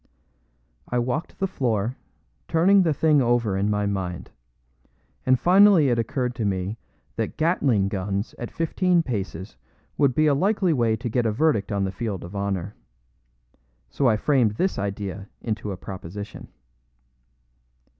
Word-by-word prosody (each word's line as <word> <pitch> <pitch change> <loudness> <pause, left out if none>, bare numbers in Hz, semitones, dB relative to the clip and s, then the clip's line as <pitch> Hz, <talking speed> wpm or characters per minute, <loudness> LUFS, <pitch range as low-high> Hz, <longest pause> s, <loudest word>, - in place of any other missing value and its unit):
I 125 - -1
walked 125 +6 -2
the 195 - 0
floor, 120 - -1 0.5
turning 190 +5 +4
the 170 -3 +2
thing 150 -1 +3
over 120 -4 +1
in 100 +2 0
my 105 0 0
mind, 90 -3 -4 1.0
and 130 -1 +4
finally 185 -5 +6
it 120 -1 +1
occurred 125 +2 -1
to 115 - -1
me 100 +2 -2 0.4
that - - -3
Gatling 140 - +2
guns 100 +1 -3
at 120 - -5
fifteen 175 +1 +1
paces 100 -6 -5 0.4
would 140 -4 +3
be 155 - +3
a 150 - +4
likely 190 +3 +2
way 115 -5 +2
to 120 +3 -5
get 120 0 0
a - - +1
verdict 115 -4 +1
on 100 -1 0
the 95 - -1
field 100 -1 -4
of 90 +4 -9
honor. 100 -1 -2 1.2
So 135 - +1
I 110 -3 +3
framed 125 -4 +2
this 185 - 0
idea 100 -1 -4
into 105 -2 -3
a 95 - -5
proposition. 95 +2 -8
115 Hz, 150 wpm, -24 LUFS, 100-150 Hz, 1.2 s, finally